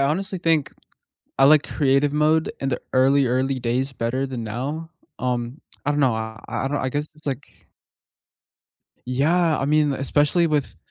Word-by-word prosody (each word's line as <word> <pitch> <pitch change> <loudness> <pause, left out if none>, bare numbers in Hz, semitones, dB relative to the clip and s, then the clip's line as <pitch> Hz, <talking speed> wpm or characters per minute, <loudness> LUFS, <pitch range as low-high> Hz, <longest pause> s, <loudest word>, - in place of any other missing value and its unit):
honestly 185 +7 -1
think 165 -4 +1 0.7
I 135 - +6
like 150 +1 +6
Creative 140 0 +1
mode 155 +2 +2
in 135 - -1
the 125 - -2
early, 135 +1 +4
early 130 +2 0
days 125 +3 -1
better 130 +2 -2
than 125 -4 -5
now. 140 +9 -4 0.3
Um, 125 +2 -3 0.2
I 145 - +1
don't 145 0 +1
know, 130 -5 +3
I 110 0 -5
I 135 - -2
don't 145 +1 -1
I 130 - -1
guess 145 +3 -2
it's, 150 0 -16
like 140 0 -2 1.7
Yeah, 155 +6 +2
I 135 - -1
mean, 150 0 +3
li 135 - -2
especially 145 +5 +2
with 150 -3 -1
140 Hz, 170 wpm, -23 LUFS, 130-150 Hz, 1.7 s, I